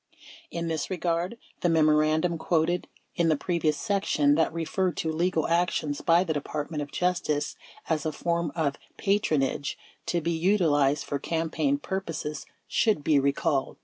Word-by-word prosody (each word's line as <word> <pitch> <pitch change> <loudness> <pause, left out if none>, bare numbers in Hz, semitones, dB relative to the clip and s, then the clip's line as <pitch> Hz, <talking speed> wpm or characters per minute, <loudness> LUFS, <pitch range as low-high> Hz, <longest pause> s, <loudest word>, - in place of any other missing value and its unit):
In 170 0 -3
this 160 -3 -2
regard, 175 +3 -1 0.2
the 175 - +1
memoran 155 -1 +4
dum 170 -1 -1
quoted 170 +2 +1 0.3
in 170 -1 +2
the 155 - +3
previous 160 -2 0
section 175 -6 +2
that 160 +2 +2
referred 175 +3 -1
to 160 - -1
legal 165 0 +1
actions 165 -4 0
by 170 +1 +4
the 165 -4 -1
Department 150 +1 -3
of 145 - -6
Justice 175 -5 0 0.3
as 155 -3 0
a 155 - -1
form 170 +1 -1
of 145 -4 0 0.2
"patronage" 155 -9 0 0.3
to 175 - +1
be 170 +1 -1
utilized 160 -6 +2
for 140 0 -3
campaign 165 - 0
purposes 165 - -4 0.2
should 215 -10 +2
be 145 -1 +4
recalled. 140 0 0
165 Hz, 150 wpm, -27 LUFS, 150-175 Hz, 0.3 s, memoran